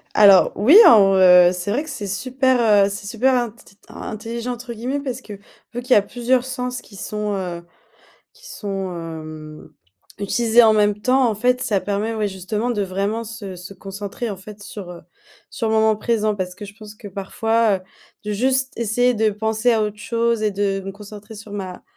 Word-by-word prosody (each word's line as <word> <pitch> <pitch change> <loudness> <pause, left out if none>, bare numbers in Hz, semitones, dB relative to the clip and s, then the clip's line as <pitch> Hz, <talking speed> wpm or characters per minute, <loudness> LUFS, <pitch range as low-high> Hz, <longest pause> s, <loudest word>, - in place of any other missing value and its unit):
Alors 200 -3 +7
oui 255 - +6
alors, 195 -4 +7
heu, 180 -1 +7
c'est 180 +2 -4
vrai 270 +8 0
que - - -10
c'est 215 -8 -6
super, 255 +5 0 0.3
heu, - - -1
c'est 200 0 -7
super 245 +5 +1
int 240 -3 0
tt 205 -3 -21
intelligent 230 +3 -6
entre 240 0 -8
guillemets 250 +5 -3
parce 260 -2 -5
que, 215 - -10 0.4
vu 245 - -4
qu'il 250 +1 -10
y - - +9
a 205 - +6
plusieurs 245 +4 0
sens 250 -1 -4
qui 200 - -15
sont, 210 +1 -3
heu, 180 -3 -4 0.7
qui - - -16
sont, 195 - -5
hem, 155 -2 -9 0.5
utilisés 230 +3 +3
en 220 - +6
même 210 -1 +2
temps, 255 +3 +3
en 220 - -1
fait, 250 +4 +1
ça 210 -5 0
permet 205 +3 -2
ouais 215 -1 -1
justement 205 +5 -3
de 220 -4 -1
vraiment 200 +4 -2
se 210 -4 -8
se 180 +2 -10
concentrer 200 +4 -6
en 200 - -5
fait 205 +2 -12
sur, 200 -3 -9
heu, 175 - -11 0.5
sur 225 - -3
le 220 - +1
moment 220 0 +3
présent 215 -1 0
parce 185 -2 -4
que 195 - -9
je 205 0 -11
pense 215 -1 -12
que 210 -1 -11
parfois, 215 +3 0
heu, - - -11 0.4
de 210 - -3
juste 260 +5 0
essayer 240 +2 +2
de 220 -1 +1
penser 220 +3 0
à 220 -1 +1
autre 210 0 -4
chose 230 0 -1
et 215 - +1
de 195 -1 -1
me 195 - -5
concentrer 210 +2 -12
sur 215 0 -11
ma, 190 -3 -6
210 Hz, 205 wpm, -21 LUFS, 195-235 Hz, 0.7 s, y